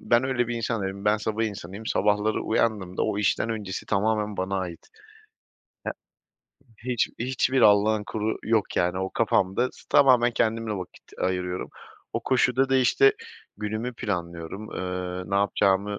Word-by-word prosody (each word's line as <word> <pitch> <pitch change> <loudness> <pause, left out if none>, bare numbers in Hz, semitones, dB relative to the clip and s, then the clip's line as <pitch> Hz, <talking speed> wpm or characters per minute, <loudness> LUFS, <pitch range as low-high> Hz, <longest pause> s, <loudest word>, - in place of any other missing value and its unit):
Ben 120 +2 +3
öyle 120 -2 0
bir 120 - -2
insan 115 -2 -2
değilim, 95 +1 -4
ben 105 +1 +4
sabah 110 +1 -1
insanıyım. 100 0 -6
Sabahları 105 +1 +1
uyandığımda 105 -5 0
o 100 - 0
işten 105 +2 +1
öncesi 105 -4 -4
tamamen 105 0 0
bana 95 +1 -1
ait. 90 -3 -6 1.7
Ya, 125 0 -7
hiç 120 - +1
hiçbir 130 +1 +1
Allah'ın 105 0 +5
kulu 110 +1 -2
yok, 110 -2 +1
yani. 90 +1 +1
O 95 0 -2
kafamda, 110 +1 +1
s - - -16
tamamen 125 -3 +6
kendimle 115 -1 0
vakit 95 -3 -7
ayırıyorum. 90 0 -2 0.4
O - - -1
koşuda 130 +1 +2
da, 135 - +3
işte, 130 - +5 0.4
günümü 110 +4 -3
planlıyorum, 85 0 -4
ııı, 90 0 -4
ne - - 0
yapacağımı 100 0 +2
105 Hz, 145 wpm, -26 LUFS, 95-115 Hz, 1.7 s, tamamen